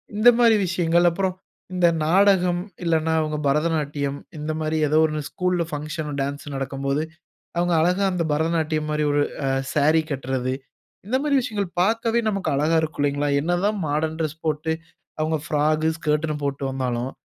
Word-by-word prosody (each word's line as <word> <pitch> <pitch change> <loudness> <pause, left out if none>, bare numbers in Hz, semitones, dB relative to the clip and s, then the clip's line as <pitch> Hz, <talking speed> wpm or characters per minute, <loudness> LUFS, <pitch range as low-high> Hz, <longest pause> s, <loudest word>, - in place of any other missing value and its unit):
இந்த 215 +4 +7
மாரி 230 -2 +6
விஷயங்கள். 170 0 +2
அப்புறம் 185 +2 -1 0.4
இந்த 180 -1 +4 0.2
நாடகம் 180 0 +4 0.2
இல்லனா, 160 -1 +1
அவங்க 155 -1 -2
பரதநாட்டியம் 145 -2 0 0.2
இந்த 150 +1 -3
மாரி 155 0 -1
ஏதோ 155 +2 +2
ஒரு 155 -1 -2
ஸ்கூல்‌ல் 180 -1 0
பங்ஷனோ, 150 +1 -4
டான்ஸ்சோ 145 +1 -4
நடக்கும்போது. 140 +2 -2 0.5
அவங்க 175 0 +2
அழகா 180 +4 +2
அந்த 175 -2 0
பரதநாட்டியம் 155 0 0
மாரி 150 0 0
ஒரு 145 - +2 0.2
அ 135 - +1 0.2
சாரி 155 +2 +4
கட்றது. 130 -1 -2 0.5
இந்த 255 +5 +1
மாரி 290 -1 +1
விஷயங்கள் 210 -6 -3
பார்க்கவே 230 +3 +2
நமக்கு 195 -2 -2
அழகா 155 +3 +2
இருக்கும் 155 -2 -3
இல்லைங்களா. 145 0 0
என்னதான் 175 +6 0
மாடர்ன் 155 +2 -1
டிரெஸ் 155 0 -3
போட்டு. 155 +1 -1 0.5
அவங்க 155 0 +1
ஃப்ராக், 155 +1 +1
ஸ்கர்ட்னு 150 0 0
போட்டு 140 0 -2
வந்தாலும். 130 -1 -2
155 Hz, 150 wpm, -23 LUFS, 145-175 Hz, 0.5 s, இந்த